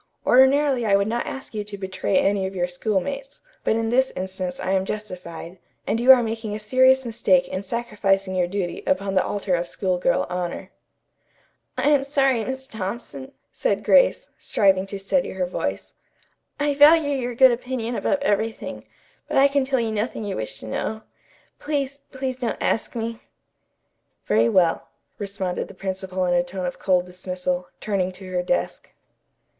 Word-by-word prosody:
Ordinarily 265 0 +4
I 205 -3 +3
would 200 +1 +2
not 235 +2 -2
ask 265 - -7
you 210 -1 -3
to 205 -1 -7
betray 190 0 -1
any 195 -1 +2
of 190 - -8
your 175 -1 0
schoolmates, 220 +9 -3 0.2
but - - +2
in 225 0 0
this 260 +3 +3
instance 185 -1 -4
I - - -2
am 190 -1 +2
justified, 180 -4 -7 0.3
and 225 - 0
you 250 +3 +7
are 255 -2 +7
making 220 -2 -3
a - - -5
serious 260 +4 +4
mistake 190 -6 +2
in 185 - -4
sacrificing 200 -3 -1
your 180 -1 +1
duty 180 -2 -3
upon 195 +1 0
the 185 - +3
altar 200 -2 -2
of 175 0 0
school 185 -1 -1
girl 175 - +2
honor." 180 -1 -4 1.1
"I - - +1
am 285 -2 +4
sorry, 270 -4 +2
Miss 265 +2 -5
Thompson," 195 - -6 0.2
said - - -1
Grace, - - +4
striving 195 -2 +2
to 200 - -5
steady 195 +8 0
her 185 -1 -1
voice. 180 - -4 0.7
"I 290 0 +1
value 295 +1 +6
your 250 -3 -2
good 260 +1 +7
opinion 240 -1 -3
above - - +1
everything, 220 -2 -2 0.4
but - - -1
I 275 +1 +7
can 280 -1 +1
tell 265 -1 +1
you 230 -1 -1
nothing 215 +1 -2
you 200 -2 -3
wish 110 - -5
to - - -8
know. 220 - -3 0.6
Please, 280 -2 -2
please 260 -1 -3
don't 245 -3 -2
ask 225 - -1
me." 230 0 -3 1.1
"Very 110 +2 +3
well," 170 +1 +2 0.3
responded 195 -3 -3
the - - -13
principal 190 -1 -3
in 175 - +1
a 175 - +4
tone 180 +1 -5
of 180 - -4
cold 180 -2 +2
dismissal, 180 0 -3
turning 190 -3 -1
to 185 0 -10
her 180 -1 0
desk. 225 +9 -2
205 Hz, 175 wpm, -23 LUFS, 185-255 Hz, 1.1 s, you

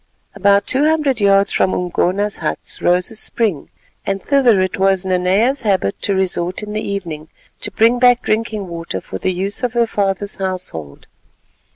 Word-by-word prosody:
About 200 0 +3
two 270 +3 +3
hundred 300 -6 +1
yards 200 0 +4
from 185 - +1
Umgona's 185 +3 -1
huts - - -5
rose 180 +3 +2
a - - -10
spring, 210 -7 -1 0.3
and 195 0 -2
thither 250 -5 +3
it 185 0 -1
was 190 -1 +2
Nanea's 190 +9 +1
habit 195 - 0
to 200 - 0
resort 185 0 -1
in 210 0 -6
the 215 - -2
evening 170 -7 -5 0.3
to - - -3
bring 230 +4 +2
back 245 -1 +4
drinking 215 -2 -2
water 170 -1 -5
for - - -8
the 185 - 0
use 190 +3 -1
of 250 -2 -1
her 235 -1 +2
father's 200 -2 -1
household. 180 - -5
200 Hz, 170 wpm, -18 LUFS, 185-225 Hz, 0.3 s, yards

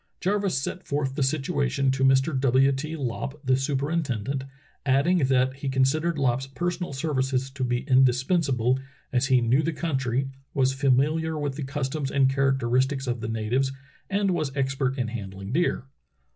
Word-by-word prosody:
Jarvis 195 -4 0
set 175 +6 -5
forth 140 -2 -1
the 140 - -3
situa 140 +1 0
tion 135 0 +1
to 135 0 -1
Mr. 135 +3 +3
W. 135 +1 +4
T. 155 +4 -3
Lopp, 135 +1 -4
the 130 0 +4
superintendent, 135 -2 -1 0.4
adding 145 +7 +3
that 130 -1 +2
he 140 0 -3
considered 150 +5 +1
Lopp's 130 -1 0
personal 175 +5 -3
services 135 -2 -1
to 135 -1 -4
be 120 0 0
indispensa 130 +3 +3
ble, 125 +3 +2 0.3
as 125 +1 +2
he 130 -2 +4
knew 120 +5 +3
the 165 - -1
country, 135 -5 -1 0.3
was 135 -1 +2
famihar 150 +4 +1
with 145 -2 -2
the 150 - -6
cus 135 0 -2
toms 140 0 -3
and 135 -1 +3
characteristics 135 0 +1
of 120 -2 -2
the 110 - -3
natives, 115 +5 0 0.4
and 200 -1 +1
was 155 -6 -1
expert 135 -1 0
in 125 -3 -1
handling 100 -3 -6
deer. 165 -2 0
135 Hz, 170 wpm, -26 LUFS, 130-145 Hz, 0.4 s, W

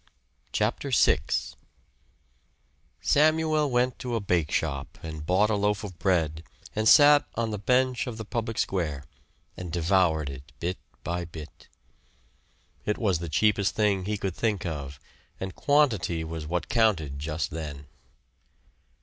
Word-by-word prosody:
CHAPTER - - -1
VI - - +4 1.8
Samuel 155 0 +3
went 125 0 +1
to 125 -3 -3
a - - +1
bake 90 -6 0
shop 70 -4 -2
and 80 -2 -6
bought 100 +4 +3
a - - +2
loaf 105 +1 0
of 90 -5 -8
bread 80 -4 +1 0.3
and 110 +1 +3
sat 145 0 +7
on 115 -1 -1
the 105 - -3
bench 125 +4 +1
of 115 -3 -5
the 110 - -6
public 115 -1 -3
square 75 -8 -1 0.5
and 90 -2 -7
devoured 85 -3 +2
it 70 +2 -11
bit 90 +2 -3 0.2
by 85 0 -2
bit. 80 -2 -11 1.2
It 105 - -1
was 95 -7 +1
the 85 -1 -5
cheapest 100 +4 +2
thing 100 -3 +1
he 105 +1 -1
could 95 -2 -3
think 105 -3 -1
of, 70 -5 -5 0.4
and 95 -1 -4
quantity 120 - +2
was 80 -1 -6
what 90 +2 -2
counted 90 - +1
just 75 +1 -3
then. 75 -3 -6
95 Hz, 140 wpm, -27 LUFS, 80-110 Hz, 1.8 s, sat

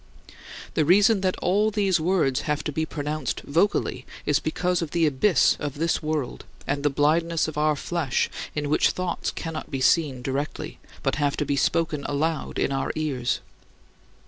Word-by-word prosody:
" - - -13
The 155 - +2
reason 200 +6 +5
that 185 -1 0
all 205 +4 +3
these 200 -4 +1
words 155 -6 +1
have 150 0 0
to 150 - -2
be 160 +2 -2
pronounced 150 -3 -3
vocally 170 +8 0 0.2
is 145 -1 +3
because 180 +3 0
of 165 - -3
the 170 +1 +2
abyss 155 +6 +3
of 145 -2 -4
this 165 +3 0
world 155 -5 -3 0.2
and 140 0 -1
the 145 - +2
blindness 160 +4 +2
of 155 - -5
our 150 0 +2
flesh 145 -3 -1 0.3
in 150 -1 -1
which 150 - +3
thoughts 180 -1 -2
cannot 160 -2 -5
be 135 - -3
seen 135 -2 +2
directly, 140 +3 -4 0.2
but - - 0
have 145 -2 0
to 150 - 0
be 140 - 0
spoken 160 0 +1
aloud 155 +2 -1
in - - +1
our 135 0 -1
ears. 140 -6 -1
155 Hz, 175 wpm, -25 LUFS, 145-170 Hz, 0.3 s, reason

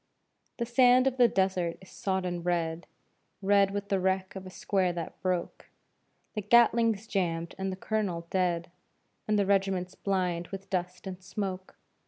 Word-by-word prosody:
The 235 - -1
sand 250 +1 +5
of 265 -1 +1
the 245 -1 +7
desert 190 -5 0
is 190 - -16
sodden 185 -4 -2
red 170 -1 -1 0.5
Red 200 0 +4
with 200 0 -4
the 195 - +2
wreck 190 +1 0
of 190 -1 -7
a - - -7
square 185 0 0
that 170 -2 -6
broke; 180 -2 -2 0.6
The 215 - -2
Gatling's 230 0 +4
jammed 170 -5 -1
and 190 0 -1
the - - -4
colonel 190 -4 -2
dead, 175 -2 0 0.6
And 215 0 +2
the 200 - +3
regiment's 190 -2 +1
blind 180 -3 -1
with 195 0 -8
dust 180 -1 -3
and 190 -1 -6
smoke. 190 -1 -5
190 Hz, 160 wpm, -29 LUFS, 180-200 Hz, 0.6 s, the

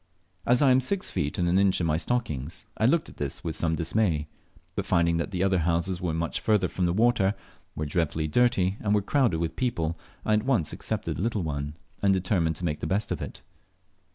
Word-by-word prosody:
As 125 +4 +5
I 135 - +6
am 130 - +5
six 185 +9 -1
feet 75 0 -2
and 90 - +1
an 90 +2 +3
inch 100 -1 +3
in 85 - 0
my 75 -1 +2
stockings, 85 - -2
I 110 - +2
looked 160 +4 +2
at - - -13
this 70 -2 -4
with 80 -2 -2
some 80 -1 0
dismay; 80 -2 0 0.5
but - - -3
finding 85 0 +3
that 85 - -2
the 95 -2 -1
other 95 -2 +2
houses 85 +2 0
were 90 -2 -1
much 85 +1 -1
further 105 -4 +2
from 90 -1 -1
water, 110 -3 +3 0.4
were 75 - -2
dreadfully 80 0 -1
dirty, 100 0 +2
and 105 -1 +1
were 105 - +1
crowded 120 - +2
with 80 0 -2
people, 85 -10 -1 0.3
I 110 - +2
at 105 - +3
once 120 - +1
accepted - - -3
the - - -3
little 110 -3 0
one, 75 -1 -4 0.2
and 100 - +4
determined 90 -4 +1
to 85 - -5
make 75 -2 -1
the - - -3
best 100 +6 -1
of - - -2
it. - - -7
90 Hz, 220 wpm, -27 LUFS, 80-110 Hz, 0.5 s, I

